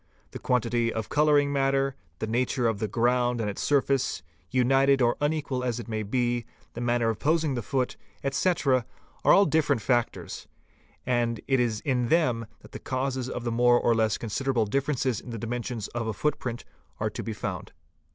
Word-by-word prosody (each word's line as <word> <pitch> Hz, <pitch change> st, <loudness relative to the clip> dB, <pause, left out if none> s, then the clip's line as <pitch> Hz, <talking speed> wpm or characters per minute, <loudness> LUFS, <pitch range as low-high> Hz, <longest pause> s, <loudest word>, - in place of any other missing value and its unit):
The -, -, -7 dB
quantity 120 Hz, -1 st, +1 dB
of 110 Hz, -1 st, -4 dB
colouring 145 Hz, -1 st, +3 dB
matter, 135 Hz, -1 st, +1 dB, 0.2 s
the -, -, -3 dB
nature 120 Hz, +2 st, 0 dB
of 110 Hz, -3 st, -1 dB
the 110 Hz, -, -1 dB
ground 120 Hz, +3 st, +1 dB
and 110 Hz, -, -1 dB
its 100 Hz, -, -4 dB
surface, 140 Hz, -5 st, +1 dB, 0.3 s
united 135 Hz, +2 st, +3 dB
or 120 Hz, -1 st, +3 dB
unequal 145 Hz, -4 st, -1 dB
as 120 Hz, -2 st, -1 dB
it 120 Hz, -, -7 dB
may 110 Hz, -1 st, -2 dB
be, 120 Hz, +2 st, -1 dB, 0.3 s
the 120 Hz, -, -6 dB
manner 120 Hz, -1 st, +1 dB
of 110 Hz, -, -2 dB
posing 155 Hz, -1 st, +1 dB
the 120 Hz, -, -2 dB
foot, 125 Hz, +3 st, -1 dB, 0.3 s
etc., 140 Hz, -3 st, +1 dB, 0.4 s
are -, -, +5 dB
all 200 Hz, -, +7 dB
different 150 Hz, -5 st, +2 dB
factors; 120 Hz, -3 st, -1 dB, 0.6 s
and 120 Hz, -2 st, 0 dB
it 135 Hz, -2 st, +3 dB
is 115 Hz, -3 st, 0 dB
in 125 Hz, -4 st, 0 dB
them 125 Hz, -8 st, +2 dB
that -, -, -15 dB
the -, -, -7 dB
causes 130 Hz, -1 st, -2 dB
of 125 Hz, -, -4 dB
the 120 Hz, -, -1 dB
more 120 Hz, +1 st, +4 dB
or 120 Hz, -, +3 dB
less 110 Hz, -2 st, +1 dB
considerable 120 Hz, +1 st, -1 dB
differences 135 Hz, +1 st, 0 dB
in -, -, -11 dB
the 115 Hz, -, -5 dB
dimensions 115 Hz, -1 st, -4 dB
of 115 Hz, -1 st, -3 dB
a 110 Hz, -, -1 dB
footprint 125 Hz, -1 st, -2 dB, 0.3 s
are -, -, -1 dB
to -, -, -5 dB
be 115 Hz, -, -4 dB
found. 95 Hz, -4 st, -5 dB
125 Hz, 185 wpm, -27 LUFS, 115-135 Hz, 0.6 s, all